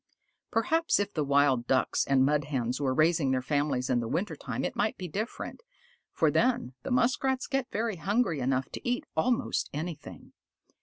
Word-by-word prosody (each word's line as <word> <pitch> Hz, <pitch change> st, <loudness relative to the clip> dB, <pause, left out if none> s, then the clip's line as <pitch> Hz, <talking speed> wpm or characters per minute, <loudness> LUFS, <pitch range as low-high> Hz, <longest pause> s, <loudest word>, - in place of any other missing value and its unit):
Perhaps 325 Hz, +8 st, +2 dB
if 205 Hz, 0 st, -2 dB
the 155 Hz, -, 0 dB
Wild 140 Hz, -3 st, +3 dB
Ducks 130 Hz, -, +1 dB
and 135 Hz, -1 st, +4 dB
the -, -, +5 dB
Mud 145 Hz, 0 st, +1 dB
Hens 130 Hz, -2 st, -2 dB
were 135 Hz, -2 st, +1 dB
raising 155 Hz, +1 st, +3 dB
their 130 Hz, -1 st, +1 dB
families 140 Hz, -2 st, 0 dB
in 125 Hz, -, +2 dB
the 115 Hz, -, -3 dB
winter 180 Hz, -, -2 dB
time -, -, -4 dB
it -, -, -3 dB
might -, -, 0 dB
be 185 Hz, -, -5 dB
different, 215 Hz, -, -5 dB, 0.5 s
for -, -, +2 dB
then 240 Hz, -, +1 dB
the -, -, -6 dB
Muskrats 255 Hz, +1 st, +1 dB
get 270 Hz, -2 st, -1 dB
hungry 205 Hz, -, 0 dB
enough 130 Hz, 0 st, 0 dB
to -, -, -4 dB
eat 245 Hz, -, -1 dB
almost 230 Hz, +10 st, 0 dB
anything. 155 Hz, +1 st, -7 dB
155 Hz, 175 wpm, -29 LUFS, -, 0.5 s, the